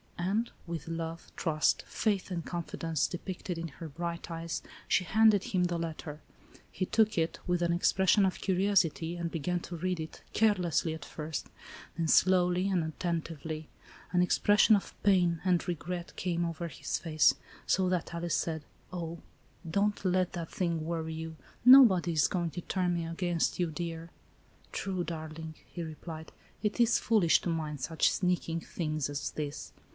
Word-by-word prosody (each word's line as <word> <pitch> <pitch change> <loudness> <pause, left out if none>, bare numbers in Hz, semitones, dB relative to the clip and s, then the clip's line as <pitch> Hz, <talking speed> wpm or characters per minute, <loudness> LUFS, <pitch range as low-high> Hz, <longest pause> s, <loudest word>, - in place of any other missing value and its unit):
And, 200 +7 0 0.2
with 165 -3 -5
love, 165 0 -5
trust, 155 -2 +1
faith 200 -3 -1
and 170 -2 -2
confi 170 0 -5
dence 165 -3 +1
depicted 180 -1 -5
in 165 - -3
her 165 +2 -9
bright 170 +3 -5
eyes, 165 0 -4 0.2
she 185 - +3
handed 215 +2 +4
him 180 -2 +1
the 175 -1 -1
letter. 160 -2 -5 0.5
He 185 - -2
took 220 -2 +2
it, 160 0 0
with 180 -1 0
an 170 0 +2
expression 190 +3 +4
of 190 - -1
curiosity, 180 -4 +2
and 170 -1 -3
began 175 +2 -1
to 175 - -7
read 180 +1 -1
it, 160 0 -7
carelessly 180 -7 +2
at 150 -2 -9
first, 155 -1 -5 0.5
then 165 -1 0
slowly 180 +2 +4
and 180 -4 +1
attentively. 160 -1 -4 0.4
An 180 0 +4
expression 205 +4 +5
of 200 - -3
pain 180 -4 +4
and 180 -1 +2
re 175 - 0
gret 175 +2 -6
came 175 -2 -1
over 170 +1 -3
his 155 - -3
face, 155 -2 +3 0.3
so 185 -1 +3
that 180 -2 -1
Alice 170 0 -1
said: 160 -2 -2
" - - -25
Oh, 170 -1 -4 0.5
don't 200 +4 +1
let 185 -1 +1
that 170 -2 -4
thing 170 -3 -1
worry 160 0 -3
you. 160 0 -6 0.3
Nobody 230 -10 +8
is 155 -2 +4
going 175 -2 -1
to 175 - -5
turn 180 -1 0
me 170 -1 -2
against 170 +1 -1
you, 175 -2 +1
dear." 165 0 -5 0.6
"True, 185 -2 -2
darling," 160 -1 -6
he 175 - -6
replied, 160 0 -8 0.3
"it 210 +3 -1
is 235 0 +5
foolish 205 -8 +3
to - - -2
mind 155 -4 -3
such 160 +4 +2
sneaking 175 -3 0
things 155 -4 -2
as 145 0 -3
this." 150 -1 -5
170 Hz, 170 wpm, -31 LUFS, 160-185 Hz, 0.6 s, Nobody